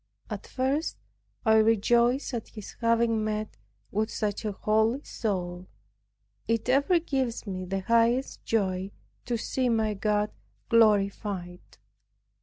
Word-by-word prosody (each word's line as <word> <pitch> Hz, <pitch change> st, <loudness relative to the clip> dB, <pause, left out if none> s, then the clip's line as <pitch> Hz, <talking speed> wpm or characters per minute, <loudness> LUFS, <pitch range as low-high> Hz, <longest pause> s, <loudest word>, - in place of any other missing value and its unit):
At -, -, -5 dB
first 270 Hz, +5 st, -1 dB, 0.5 s
I 220 Hz, 0 st, +6 dB
rejoiced 235 Hz, +5 st, +3 dB
at 230 Hz, -3 st, -3 dB
his 215 Hz, -3 st, -10 dB
having 230 Hz, -1 st, +2 dB
met 215 Hz, 0 st, -3 dB, 0.4 s
with 215 Hz, +2 st, 0 dB
such 210 Hz, -1 st, -2 dB
a 210 Hz, -, 0 dB
holy 220 Hz, +6 st, +1 dB
soul. 180 Hz, -4 st, -3 dB, 0.8 s
It 230 Hz, +1 st, 0 dB
ever 285 Hz, +7 st, +4 dB
gives 265 Hz, -9 st, -2 dB
me 185 Hz, -2 st, -4 dB
the 195 Hz, +1 st, -2 dB
highest 235 Hz, +5 st, +2 dB
joy 190 Hz, -3 st, 0 dB, 0.4 s
to 240 Hz, -1 st, -1 dB
see 255 Hz, +2 st, -1 dB
my 220 Hz, -2 st, +1 dB
God 210 Hz, +1 st, 0 dB, 0.4 s
glorified. 200 Hz, -5 st, +2 dB
220 Hz, 120 wpm, -28 LUFS, 205-235 Hz, 0.8 s, I